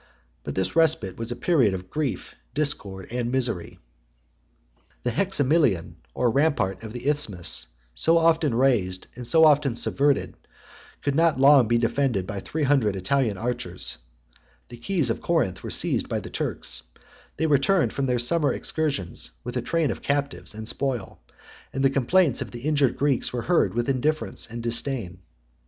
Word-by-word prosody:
But - - -5
this 95 -1 -1
respite 160 - +3
was 115 +1 -4
a - - -2
period 125 - +2
of 90 0 -9
grief, 150 -3 -3 0.2
discord, 100 -11 0
and 120 -1 -2
misery. 120 -8 -2 1.3
The 125 - 0
hexamilion, 140 - +1 0.2
the 125 - -1
rampart 120 -8 +1
of 110 -1 -8
the 120 +3 -6
Isthmus, 110 - 0 0.3
so 165 - +3
often 160 -5 +3
raised 110 -8 +1
and 125 -1 -6
so 160 +3 +5
often 145 -5 +4
subverted, 140 +3 +1 0.7
could 140 - 0
not 160 -2 +2
long 135 -3 +6
be 120 +1 +2
defended 115 -4 0
by 100 0 -5
three 155 +10 -3
hundred 130 -8 +2
Italian 110 +2 0
archers: 95 - -4 0.7
the 120 - -10
keys 155 -2 0
of - - -4
Corinth 160 - 0
were - - -6
seized - - +1
by - - -1
the - - -9
Turks: - - -3 0.6
they 160 - 0
returned 155 +5 +2
from 135 -1 -1
their 125 -1 +1
summer 145 +6 +2
excursions 140 - -2
with - - -6
a - - 0
train 165 -5 0
of - - -6
captives 140 -5 -2
and 110 0 -7
spoil; 125 -5 -2 0.5
and 135 +1 -1
the 135 - +4
complaints 140 +2 +2
of - - -4
the 120 - -9
injured 145 -3 +1
Greeks 140 -3 0
were 120 -2 -3
heard 175 -9 +2
with 120 0 -1
indifference 145 +4 -1
and 115 0 -7
disdain. 115 -6 -2
130 Hz, 165 wpm, -25 LUFS, 115-150 Hz, 1.3 s, long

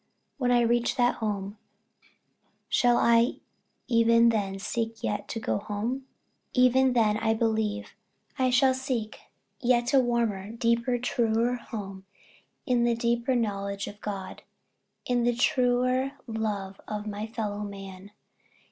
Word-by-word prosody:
When 250 -2 +1
I 245 -1 +4
reach 235 0 +1
that 245 -1 +2
home, 205 -1 -3 1.1
shall 245 -1 +3
I 235 +2 +4 0.5
even 230 -1 +5
then 200 -4 -1
seek 225 +3 -3
yet 205 - -2
to 225 - -4
go 220 - -1
home? 225 +6 -4 0.5
Even 255 0 +4
then, 215 -3 +3
I 225 0 +1
believe, 220 -1 -1 0.5
I 260 -1 +3
shall 260 +1 +4
seek 255 -5 -3
a - - -21 0.5
yet 240 +1 +3
warmer, 235 -6 +1
deeper, 235 +1 +1
truer 235 -1 +1
home 195 -5 -7 0.6
in 245 -3 +2
the 235 -1 +2
deeper 235 +2 0
knowledge 200 -3 -2
of 205 0 -10
God 195 -2 -6 0.6
in 245 -1 +1
the 240 0 +2
truer 255 +2 +2
love 210 -4 -4
of 210 0 -4
my 210 +1 -4
fellow 210 -2 -4
man. 195 -1 -8
230 Hz, 130 wpm, -27 LUFS, 210-245 Hz, 1.1 s, even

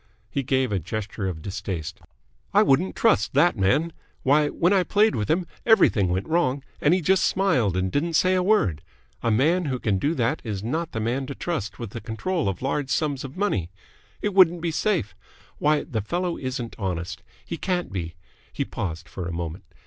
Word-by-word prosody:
He 140 - 0
gave 130 -2 +1
a 100 - +1
gesture 100 +3 -4
of 80 -4 -5
distaste. 95 -5 -5 0.6
"I - - +7
wouldn't 145 +8 +2
trust 225 - +2
that 175 - +5
man. 120 - +1 0.3
Why, 145 +3 +4
when 175 +5 +2
I 195 - +4
played 210 +4 +3
with 105 -2 -2
him, 175 +3 +2 0.2
everything 120 - +4
went 90 +2 -1
wrong, 150 -5 +1 0.2
and 150 +4 +4
he 185 - 0
just 190 +3 +3
smiled 125 - +2
and 95 0 0
didn't 165 +3 0
say 185 +3 +4
a 185 - +2
word. 115 - +2 0.4
A 115 - +1
man 155 +11 +3
who 130 -3 -1
can 105 -5 0
do 150 - 0
that 120 -3 0
is 105 -4 -4
not 160 +8 -2
the 110 - -2
man 125 +5 -1
to 140 - -6
trust 155 - -3
with 115 -5 -6
the 115 - -6
control 115 - -2
of 95 +4 -5
large 135 0 -1
sums 140 0 0
of 135 +4 -8
money. 185 - 0 0.5
It 205 - 0
wouldn't 175 -3 +5
be 170 -1 -1
safe. 165 - 0 0.5
Why, 150 0 +2
the 115 -8 -3
fellow 175 - -2
isn't 130 -3 -4
honest! 90 -2 -3 0.2
He - - -5
can't 180 -2 -2
be." 85 -3 -4 0.4
He - - -2
paused 85 -4 -5
for 90 -3 -6
a - - -4
moment. 85 +1 -5
130 Hz, 200 wpm, -25 LUFS, -, 0.6 s, I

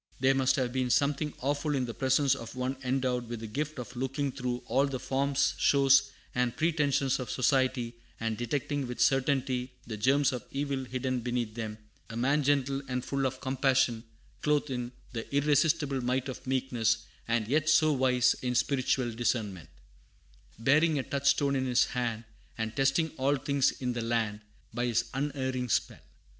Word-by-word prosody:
There 135 +1 +4
must 135 -1 +2
have 125 -2 -1
been 130 -1 0
something 145 +4 +1
awful 145 +2 0
in 130 -2 0
the 115 - -5
presence 135 +2 +2
of 115 -2 -7
one 130 +1 -2
endowed 125 -2 -1
with 120 -1 -4
the - - -5
gift 145 +7 -3
of 125 0 -7
looking 135 +2 -2
through 125 -1 -3
all 140 +1 +2
the 135 -2 -4
forms, 140 +1 +1
shows, 135 -1 +5 0.2
and 125 -1 0
pretensions 145 -4 +1
of 125 -3 -5
society, 130 -2 +1 0.3
and 115 -1 -1
detecting 135 +3 -2
with 125 - -6
certainty 130 -2 +1
the 110 -2 -5
germs 140 +6 +3
of 125 - -4
evil 140 -1 -2
hidden 130 0 -2
beneath 120 -2 -2
them; 110 -2 -5 0.3
a 115 - -6
man 140 +5 +2
gentle 140 -1 +1
and 125 -1 -3
full 135 -1 0
of 130 0 -6
compassion, 130 -3 +1 0.4
clothed 150 -1 +1
in 125 -1 -3 0.2
"the 115 -1 -5
irresistible 145 -1 +2
might 125 +2 0
of 130 - -8
meekness," 130 -4 0 0.2
and 115 -2 0
yet 155 +4 +2
so 155 -1 +5
wise 125 -2 +3
in 125 -1 -1
spiritual 130 -1 +1
discernment, 110 -7 -2 0.9
"Bearing 150 +7 +3
a 135 - 0
touchstone 140 0 +1
in 130 -1 0
his 125 0 +4
hand 120 -3 -2 0.3
And 110 -1 -3
testing 140 +4 +2
all 135 +2 +2
things 140 0 +1
in 125 -1 -3
the 120 - -3
land 115 -2 -1 0.3
By 120 +1 -1
his 120 0 +1
unerring 130 -2 -2
spell. - - 0
130 Hz, 170 wpm, -29 LUFS, 120-140 Hz, 0.9 s, shows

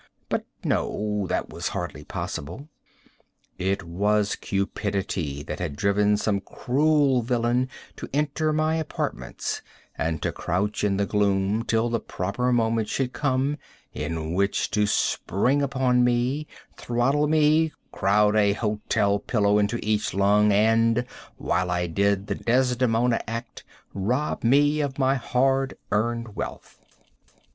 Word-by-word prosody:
But - - -2 0.2
no. 105 -2 -1
That - - -2
was - - -4
hardly - - -5
possible. 90 - -6 0.9
It 95 +2 0
was 100 +4 +1
cupidity 95 -7 -2
that - - -6
had 70 - -3
driven 100 +4 +2
some 100 -2 0
cruel 140 +2 +2
villain 120 +1 0 0.3
to - - -7
enter 150 +2 0
my 155 +1 +1
apartments 65 - -3 0.3
and 80 -1 -1
to - - 0
crouch 100 +5 -2
in 100 -2 +1
the 100 - +1
gloom 100 +1 +1
till 115 +1 +1
the 115 -1 0
proper 110 +8 -2
moment 115 -2 +1
should 130 -2 -1
come 140 +1 0 0.4
in 80 0 -3
which 100 +2 0
to 105 0 +2
spring 125 +6 +1
upon 130 -3 +2
me, 125 +5 +1 0.3
throttle 135 +5 +1
me, 155 +1 +3 0.2
crowd 105 +2 +3
a 100 -2 +4
hotel 105 -1 0
pillow 105 -1 +2
into 105 +3 +1
each 105 -2 0
lung, 105 +2 +4
and, 115 +3 +3 0.3
while 90 +1 0
I 90 0 0
did 100 +3 +1
the - - -2
Desdemona 125 -1 +1
act, 115 +2 -6 0.3
rob 125 +10 -1
me 145 +5 +4
of 140 -2 -3
my 135 -1 +3
hard 135 +1 +1 0.2
earned 115 +1 -1
wealth. - - -6
110 Hz, 130 wpm, -25 LUFS, 100-130 Hz, 0.9 s, a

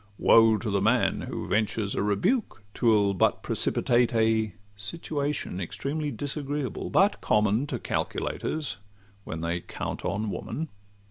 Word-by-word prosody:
Woe 115 -1 +6
to 110 -1 -3
the 100 -1 +1
man 115 +4 +2
who - - -4
ventures 105 -1 0
a - - -1
rebuke! 110 - 0
'Twill 105 -4 +3
but 95 - +2
precipitate 120 0 +1
a 110 -3 +2 0.2
situation 140 - -3
Extremely 145 - -3
disagreeable, 145 0 -3
but - - +3
common 110 +5 +2
To - - -3
calculators 155 -8 -2 0.5
when 80 - -5
they 85 +1 -1
count - - -5
on 105 +1 -1
woman. 160 +9 -4
110 Hz, 130 wpm, -27 LUFS, 100-140 Hz, 0.5 s, Woe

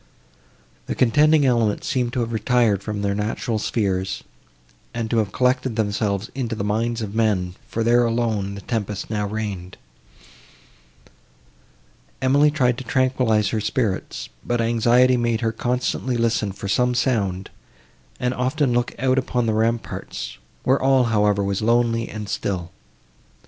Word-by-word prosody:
The - - -2
contending 150 +4 +4
elements 115 -5 +1
seemed 125 -2 0
to 125 - 0
have 115 0 -3
retired 110 -2 +2
from 105 0 -4
their 100 0 +1
natural 110 +2 -2
spheres, 95 -4 -1 0.7
and 115 -1 -3
to 120 - +2
have 105 -3 -1
collected 130 0 +1
themselves 105 -1 -1
into 120 -4 -3
the 100 - -3
minds 115 +3 -1
of 100 -1 -5
men, 105 -5 +1
for 115 - -2
there 120 +1 +4
alone 115 -4 -1
the 100 - -8
tempest 105 -1 -3
now 105 -1 -1
reigned. 100 -4 -5 2.4
Emily 140 +3 +4
tried 125 -5 +1
to - - -6
tranquillize 125 -4 +1
her 110 - -1
spirits, 110 -1 -2
but 120 0 -1
anxiety 120 +2 +4
made 120 -2 0
her 115 -1 +1
constantly 125 +1 -1
listen 115 -3 +1
for 100 +1 -7
some 125 +5 +2
sound, 100 -7 0 0.7
and 125 0 0
often 130 +1 0
look 120 0 0
out 130 +1 +2
upon 125 -2 -1
the 110 - +1
ramparts, 115 - -2 0.2
where 130 +2 +2
all, 135 -1 +4
however, 105 -1 +3
was 100 +1 -1
lonely 115 0 +2
and 105 -1 -6
still. 90 -4 -3
115 Hz, 145 wpm, -22 LUFS, 105-125 Hz, 2.4 s, contending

